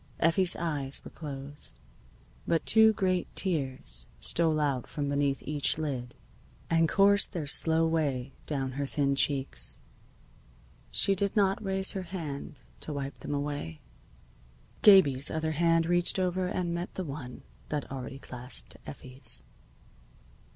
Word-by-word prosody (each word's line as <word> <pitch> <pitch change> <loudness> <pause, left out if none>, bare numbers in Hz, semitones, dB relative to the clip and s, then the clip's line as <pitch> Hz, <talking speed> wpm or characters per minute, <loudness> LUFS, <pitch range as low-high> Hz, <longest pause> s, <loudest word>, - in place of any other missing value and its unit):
Effie's 170 +2 +3
eyes 145 -5 -2
were - - -9
closed. 145 -1 -8 0.7
But 165 - +1
two 220 0 +6
great 185 -3 0
tears 130 - -2
stole 160 - +2
out 140 -5 0
from 145 -1 -3
beneath 140 -1 0
each 150 0 0
lid 130 -6 -4 0.6
and 165 -1 +4
coursed 200 +1 +4
their 165 -5 -3
slow 160 +3 +3
way 140 -5 -1
down 135 -3 -2
her 140 +2 -3
thin 140 0 +1
cheeks. 135 - 0 1.1
She 195 - +3
did 200 +2 0
not 200 +1 +2
raise 190 -1 0
her 195 - -4
hand 160 -7 -6 0.2
to - - -5
wipe 140 -1 -5
them 145 - -4
away. 145 - -4 1.0
Gabie's 145 -10 +6
other 160 0 -1
hand 165 +1 +3
reached 175 +2 +3
over 185 0 0
and 180 -2 -2
met 170 +2 -4
the 190 - -2
one 140 -5 -7 0.3
that 150 -3 -3
already 135 0 -6
clasped 125 -1 -3
Effie's. 130 -1 -3
150 Hz, 135 wpm, -29 LUFS, 135-175 Hz, 1.1 s, two